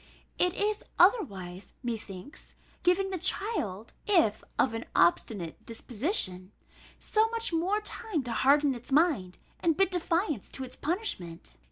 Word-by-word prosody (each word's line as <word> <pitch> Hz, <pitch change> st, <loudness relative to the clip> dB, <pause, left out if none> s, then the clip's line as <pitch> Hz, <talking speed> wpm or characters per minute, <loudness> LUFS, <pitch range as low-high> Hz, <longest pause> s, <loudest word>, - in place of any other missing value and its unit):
It 360 Hz, -1 st, +2 dB
is 420 Hz, +1 st, 0 dB
otherwise, 195 Hz, -, +2 dB
methinks, 225 Hz, -, -7 dB, 0.3 s
giving 385 Hz, +2 st, +2 dB
the 370 Hz, -, -2 dB
child, 310 Hz, -, -1 dB
if 325 Hz, -, +3 dB
of 255 Hz, -, +3 dB
an 225 Hz, +1 st, -4 dB
obstinate 170 Hz, 0 st, +1 dB
disposition, 225 Hz, -, -3 dB, 0.5 s
so 440 Hz, +1 st, +2 dB
much 460 Hz, -4 st, +1 dB
more 375 Hz, +6 st, +1 dB
time 420 Hz, -, -2 dB
to 245 Hz, -, -5 dB
harden 280 Hz, +3 st, +4 dB
its 245 Hz, +2 st, -9 dB
mind, 275 Hz, -, +2 dB, 0.2 s
and 330 Hz, -3 st, +2 dB
bid 390 Hz, -1 st, +3 dB
defiance 335 Hz, -, -1 dB
to 265 Hz, -, -5 dB
its 255 Hz, -, -9 dB
punishment. 190 Hz, -, -4 dB
295 Hz, 135 wpm, -29 LUFS, -, 0.5 s, harden